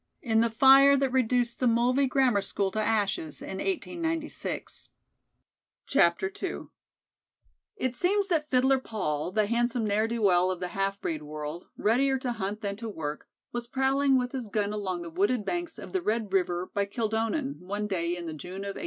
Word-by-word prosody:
in 225 -3 +3
the 230 - +2
fire 270 +4 +7
that 270 -1 +1
reduced 245 -2 +1
the 255 - +2
Mulvey 245 +4 +3
Grammar 255 -5 +3
School 195 0 -1
to 215 - -1
ashes 205 -8 0
in 190 - -6
1896. 330 -4 -3 1.1
II 190 - +2 1.2
It 260 - -2
seems 395 +8 +1
that 310 -4 0
Fiddler 265 +1 +3
Paul, 175 - -3
the 215 +2 +2
handsome 235 +1 0
ne'er 210 +2 +1
do 230 -1 -3
well 180 -2 +4
of 185 -1 -2
the 180 -1 -3
half 195 +2 -1
breed 155 -2 -3
world, 150 +2 -6
readier 265 +5 +2
to 255 -1 -3
hunt 210 -1 -4
than 200 -2 -3
to 230 0 -5
work, 155 -6 -5 0.2
was 240 0 -4
prowling 270 +1 +2
with 250 -1 -1
his 255 -4 -4
gun 205 0 -1
along 190 -4 -3
the 170 - -8
wooded 205 +6 +1
banks 345 - -3
of - - -9
the 375 - +1
Red 215 - -1
River 180 -1 0
by 200 0 +1
Kildonan, 225 +6 -1
one 205 +3 -4
day 175 -3 -1
in 175 - -6
the 160 - -5
June 180 +5 -7
of 200 0 -4
1880. - - -8
220 Hz, 180 wpm, -28 LUFS, 190-260 Hz, 1.2 s, fire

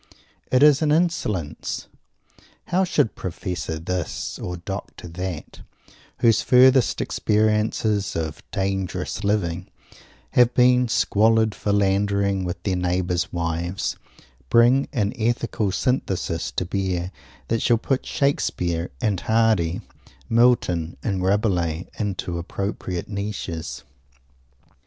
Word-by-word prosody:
It 130 +2 +5
is 150 -1 +6
an 150 -2 +2
insolence! 150 - -1 0.8
How 185 +2 +3
should 170 - +1
Professor 90 -2 -4
This, 85 0 -4
or 90 0 -4
Doctor 95 +1 -7
That, 90 -1 -6 0.6
whose 115 -2 +4
furthest 130 0 +5
experiences 105 -1 +1
of 80 -1 -3
"dangerous 95 0 -2
living" 95 -4 0 0.6
have 125 0 +4
been 125 0 +5
squalid 110 0 +3
philanderings 100 -1 +1
with 90 - -5
their 95 -3 0
neighbours' 90 0 0
wives, 85 +2 -2 0.5
bring 125 +4 +5
an 105 -4 0
Ethical 115 -3 0
Synthesis 95 -6 -1
to 90 - -1
bear 90 -1 -2 0.4
that 115 0 +1
shall 120 - +3
put 130 +3 -1
Shakespeare 90 - -1
and 100 -4 +1
Hardy, 110 -6 +2 0.5
Milton 115 -9 +2
and 95 -4 -1
Rabelais, 90 -4 +1
into 95 -4 -2
appropriate 90 0 -4
niches? 100 -5 -5
100 Hz, 105 wpm, -23 LUFS, 90-115 Hz, 0.8 s, is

